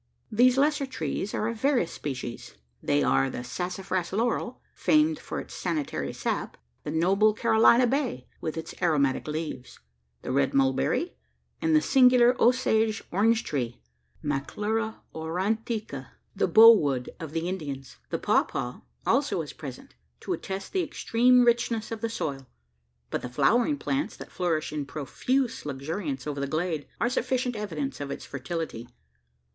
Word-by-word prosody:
These 245 +4 +4
lesser 290 0 +2
trees 210 -5 -3
are 215 - 0
of 230 -1 -4
various 265 - +2
species. 125 -4 -6 0.3
They 70 0 +2
are 65 0 +3
the 125 - -5
sassafras 180 +4 -3
laurel, 235 +4 -1
famed 305 0 +3
for - - -5
its - - -9
sanitary 160 -5 -2
sap; - - -3 0.3
the - - -5
noble 195 +7 +3
Carolina 225 +3 +5
bay, 245 - -1
with 160 0 -3
its 160 - -5
aromatic 145 -7 +2
leaves; 150 -5 -5 0.4
the - - -3
red 135 +1 +1
mulberry: 135 - +1 0.5
and 160 -1 +3
the 155 - +4
singular 250 -2 +6
Osage 225 -3 +3
orange 225 +5 +3
tree 120 - -3 0.4
(Maclura 210 +10 -2
aurantica), 210 +7 -2 0.3
the - - +2
"bow 225 +1 +10
wood" 135 - -1
of 160 -4 -6
the 165 +1 -1
Indians. 140 - -5
The - - -1
pawpaw - - 0 0.3
also - - +1
is - - -9
present, - - -9 0.3
to - - -2
attest 195 0 -5
the 375 - +2
extreme 250 -5 +3
richness 235 -2 +1
of 225 - -4
the 230 - -1
soil; 140 - -4 0.6
but - - -1
the 125 - -5
flowering 240 - +2
plants, 280 +1 -2
that - - -10
flourish 160 -4 -1
in 145 -2 -3
profuse 240 - -1
luxuriance 140 0 -4
over 145 -2 -3
the 140 - -1
glade, 155 0 -2
are 235 - +2
sufficient 250 0 0
evidence 155 -11 -4
of 140 - -4
its 140 - -6
fertility. 140 -3 -5
185 Hz, 150 wpm, -27 LUFS, 145-235 Hz, 0.6 s, bow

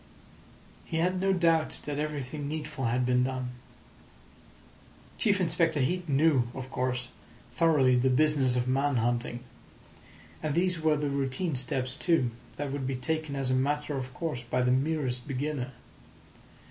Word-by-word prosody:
He 160 - -4
had 180 +2 +1
no 195 0 +3
doubt 165 -4 +2
that 145 -1 -3
everything 145 -1 -3
needful 150 -3 -4
had 125 +2 +1
been 125 0 +3
done. 130 -1 -2 1.7
Chief 200 -4 +3
Inspector 165 -3 +2
Heat 170 +5 0
knew, 140 -3 +3
of 130 0 -6
course, 125 -1 -2 0.4
thoroughly 145 -7 +4
the 125 +2 +3
business 135 -2 +3
of 125 0 0
man 135 +2 +1
hunting. 120 +1 -1 1.0
And 155 -2 -1
these 180 -1 +2
were 155 -1 +3
the 145 -1 -1
routine 140 +5 -1
steps, 130 0 -1
too, 150 -6 +2 0.3
that 145 -1 -3
would 135 -2 -3
be 135 - -1
taken 155 +3 -2
as 135 -2 -1
a - - +3
matter 145 +3 0
of 130 -1 -4
course 160 -8 -3
by 125 +1 -1
the 125 - +3
merest 130 -2 0
beginner. 140 -1 -2
140 Hz, 150 wpm, -29 LUFS, 130-155 Hz, 1.7 s, thoroughly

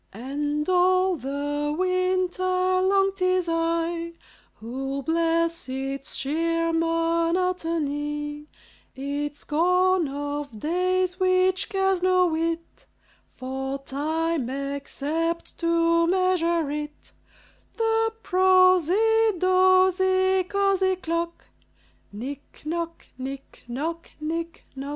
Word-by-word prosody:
And 290 +6 -3
all 370 0 +3
the 290 +1 -2
winter 370 0 0
long 370 +1 +2
't 390 -1 -4
is 365 -1 +2
I 335 0 -1 0.4
Who 270 +4 -5
bless 335 0 0
its 270 +1 -4
sheer 330 +3 0
monotony 330 -3 -1 0.5
Its 285 +2 -4
scorn 360 +2 +2
of 285 -3 -5
days, 365 - 0
which 370 0 +2
cares 385 -2 +1
no 365 0 +4
whit 330 0 -3 0.5
For 265 +1 -4
time, 300 +1 -2
except 280 +4 -3
to 335 0 +2
measure 340 -4 +1
it: 295 0 -6 0.7
The 450 -1 +1
prosy, 375 +4 +4
dozy, 375 +1 +3
cosy 390 -1 +1
clock, 335 -1 -3 0.7
Nic 265 +8 -8
noc, 335 +1 -4
nic 270 +1 -7
noc, 325 +7 -4
nic 330 +2 -4
noc! 275 +1 -6
335 Hz, 90 wpm, -25 LUFS, 295-370 Hz, 0.7 s, no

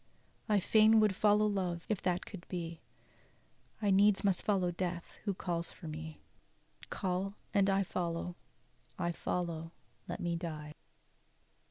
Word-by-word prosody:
"I 210 -1 +5
fain 220 +3 +6
would 210 -3 +4
follow 210 +1 +4
love, 185 -4 -1
if 215 -4 -1
that 180 0 0
could 195 -5 -9
be; 170 -2 -4 1.0
I 205 - +4
needs 200 +1 +5
must 195 -3 +2
follow 190 -4 +2
death, 175 -1 -4
who 200 -3 0
calls 170 -2 -2
for 165 - -10
me; 155 0 -7 0.7
Call 190 +1 -1 0.2
and 200 -1 +4
I 195 0 +3
follow, 175 -1 -2 0.6
I 170 - 0
follow'! 170 -1 -3 0.3
let - - -4
me 170 -1 -1
die!" 155 -3 -5
180 Hz, 140 wpm, -34 LUFS, 170-200 Hz, 1.0 s, fain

